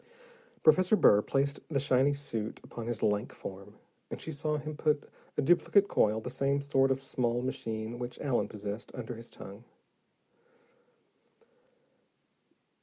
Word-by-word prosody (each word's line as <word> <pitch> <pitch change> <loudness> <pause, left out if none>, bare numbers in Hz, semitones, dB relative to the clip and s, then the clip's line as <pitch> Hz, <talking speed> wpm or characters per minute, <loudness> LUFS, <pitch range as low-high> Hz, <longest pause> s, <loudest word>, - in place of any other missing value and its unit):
Professor 185 +6 +5
Burr 105 - +6
placed 140 +5 0
the 145 -4 +1
shiny 135 0 +3
suit 115 -7 -4
upon 115 -1 -7
his 120 -2 -3
lank 105 +2 +1
form, 100 +2 -9 0.3
and - - -6
she 160 - -6
saw 150 +1 -1
him 150 +1 -5
put 150 -1 0 0.3
a - - +2
duplicate 175 +5 +4
coil, 110 +1 +3
the 110 - -8
same 135 +2 +1
sort 135 -1 +2
of 135 0 +1
small 125 -2 -1
machine 115 -2 -4
which 125 0 -5
Allen 135 -4 0
possessed, 105 +1 -6
under 120 -1 -5
his 115 0 -9
tongue. 100 +4 -11
130 Hz, 140 wpm, -31 LUFS, 110-145 Hz, 0.3 s, Burr